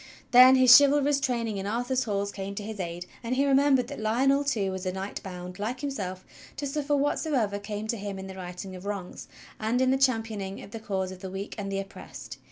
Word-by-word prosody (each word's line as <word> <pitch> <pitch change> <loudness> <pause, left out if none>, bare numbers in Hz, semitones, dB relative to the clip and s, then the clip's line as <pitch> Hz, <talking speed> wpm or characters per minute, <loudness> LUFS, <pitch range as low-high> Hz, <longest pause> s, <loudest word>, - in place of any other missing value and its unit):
Then 255 +1 +9
his 255 -1 +9
chivalrous 285 0 +5
train 245 -4 -1
ing 210 -2 -3
in 195 0 -4
Arthur's 245 +4 -1
halls 200 -2 -1
came 195 0 -6
to 205 - -5
his 215 0 -7
aid, 175 0 -4 0.2
and 235 +2 -1
he 275 +2 +2
remembered 270 -2 +4
that 285 - -7
Lionel 265 +6 +2
too 215 -9 0
was 190 -1 -5
a - - 0
knight 190 +2 -5
bound, 180 -1 -8
like 235 +6 -3
himself, 195 -10 -4 0.3
to 285 - -3
suffer 290 +1 -1
whatsoever 275 -7 0
came 205 +1 -5
to 230 +1 -2
him 200 -1 -5
in 190 - -7
the 190 - -8
righting 185 0 -7
of 185 +2 -9
wrongs, 200 -3 -5 0.3
and 220 +3 0
in 260 0 +3
the 265 - +3
championing 225 -7 0
of - - -12
the 225 - -6
cause 190 -3 -3
of 185 - -9
the 190 0 -6
weak 195 +2 -6
and 195 -1 -4
the 195 - -1
oppressed. 135 -10 -8
215 Hz, 230 wpm, -27 LUFS, 190-260 Hz, 0.3 s, Then